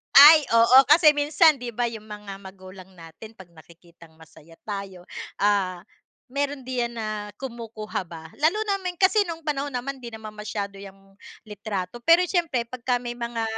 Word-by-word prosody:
Ay, 300 +2 +10
oo. 235 +3 +7
kasi 300 +1 +5
minsan, 300 +2 +4
di 245 -2 -7
ba 240 +1 -1
yung 225 -2 -8
mga 210 -2 -9
magulang 190 -1 -13
natin 165 +7 -12
pag 190 -5 -15
nakikitang 170 0 -19
masaya 160 0 -18
tayo, 195 -3 -7 0.3
ah, 195 -3 +1 0.5
meron 280 0 -3
diyan 245 -2 -2
na 220 -2 -4 0.3
kumukuha 230 -5 -6
ba. 165 -1 -10
Lalo 320 +8 +2
namin 380 -3 -2
kasi 405 +2 +4
nung 330 -1 -6
panahon 290 -1 -3
naman 265 +2 -5
hindi 240 -2 -9
naman 220 -1 -10
masyado 210 -1 -5
yang 195 0 -14 0.3
litrato, 205 0 -5
pero 335 +5 +5
siyempre 330 -10 0
kapagka 250 0 -2
may 240 0 -6
mga 235 -1 -4
230 Hz, 160 wpm, -24 LUFS, 195-275 Hz, 0.5 s, Ay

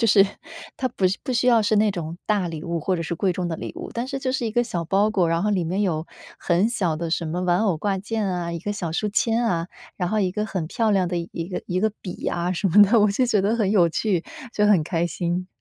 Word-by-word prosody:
就 230 - +3
是 195 -2 +6 0.5
它 260 - 0
不 230 -6 -3 0.2
不 - - -3
需 250 +1 +1
要 235 -2 +6
是 215 +1 +2
那 210 0 +4
种 170 -3 -5
大 205 -4 +1
礼 160 -2 -6
物 170 -1 -2
或 185 +4 0
者 165 - -3
是 170 +1 -3
贵 185 +2 0
重 180 -2 -2
的 165 - -2
礼 - - -6
物， - - -7
但 235 +2 -3
是 275 0 -3
就 260 -1 -2
是 255 -2 -1
一 - - -2
个 240 +1 +3
小 180 -7 -3
包 200 +4 +2
裹， 180 -5 +2
然 165 +2 +1
后 210 - +1
里 195 -3 +1
面 185 +5 -1
有 165 -4 -1 0.3
很 180 +5 +2
小 175 -9 0
的 165 +1 -4
什 165 0 -1
么 175 +3 -2
玩 175 +1 +2
偶 200 -6 +1
挂 195 +4 -1
件 215 +2 -2
啊， 175 -2 -2
一 170 - -3
个 205 +5 -3
小 180 -5 -4
书 210 +5 -1
签 225 +3 +1
啊， 170 -7 0 0.3
然 180 -2 -1
后 215 +2 +1
一 185 - +1
个 210 +3 -2
很 185 -7 -3
漂 220 +6 0
亮 190 -3 +2
的 175 - -2
一 170 0 -5
个 185 - -4
一 180 +1 -1
个 220 +2 +2
笔 180 - -6
呀 175 +1 -1
什 185 +3 -1
么 190 +5 +6
的， 215 +4 +5
我 210 -1 +4
就 250 +6 +1
觉 215 -4 +2
得 210 +3 +2
很 205 -4 +1
有 180 -5 +4
趣， 180 -1 0 0.3
就 210 - +3
很 200 -6 +5
开 170 +2 -1
心。 175 +1 -2
190 Hz, 305 characters per minute, -23 LUFS, 170-215 Hz, 0.5 s, 是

